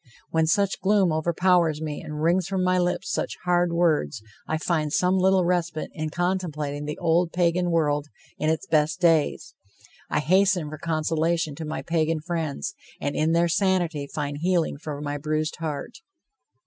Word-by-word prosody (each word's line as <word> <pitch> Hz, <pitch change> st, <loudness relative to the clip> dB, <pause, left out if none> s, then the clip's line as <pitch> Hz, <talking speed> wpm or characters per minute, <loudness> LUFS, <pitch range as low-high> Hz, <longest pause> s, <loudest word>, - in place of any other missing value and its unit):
When 160 Hz, -1 st, +2 dB
such 200 Hz, +3 st, +1 dB
gloom 195 Hz, -2 st, +3 dB
overpowers 170 Hz, 0 st, +2 dB
me 155 Hz, -2 st, -4 dB
and 150 Hz, 0 st, -5 dB
wrings 175 Hz, +1 st, +2 dB
from 190 Hz, -1 st, -1 dB
my 185 Hz, 0 st, +2 dB
lips 180 Hz, +2 st, -1 dB
such -, -, -2 dB
hard 175 Hz, -1 st, +2 dB
words, 160 Hz, -, +1 dB, 0.2 s
I 160 Hz, -, 0 dB
find 155 Hz, -2 st, -1 dB
some 185 Hz, +4 st, +2 dB
little 190 Hz, -1 st, +3 dB
respite 175 Hz, -3 st, -1 dB
in 155 Hz, 0 st, -3 dB
contemplating 155 Hz, -5 st, -2 dB
the 150 Hz, 0 st, -4 dB
old 170 Hz, 0 st, +2 dB
Pagan 175 Hz, 0 st, +1 dB
world 150 Hz, -3 st, +1 dB, 0.3 s
in 155 Hz, -, +1 dB
its 160 Hz, -1 st, -1 dB
best 155 Hz, +2 st, +1 dB
days. 160 Hz, -3 st, +2 dB, 0.6 s
I -, -, +1 dB
hasten 185 Hz, 0 st, +2 dB
for 155 Hz, -, -7 dB
consolation 160 Hz, 0 st, 0 dB
to 160 Hz, +3 st, -6 dB
my 155 Hz, -, -4 dB
Pagan 165 Hz, -1 st, 0 dB
friends, 155 Hz, -, -3 dB, 0.3 s
and 145 Hz, -, -2 dB
in 155 Hz, +1 st, +2 dB
their 170 Hz, +1 st, +3 dB
sanity 170 Hz, -4 st, 0 dB
find 145 Hz, 0 st, -4 dB
healing 170 Hz, -4 st, 0 dB
for 150 Hz, -2 st, -6 dB
my 145 Hz, 0 st, -3 dB
bruised 155 Hz, +1 st, -2 dB
heart. 155 Hz, -, -5 dB
165 Hz, 165 wpm, -25 LUFS, 155-180 Hz, 0.6 s, gloom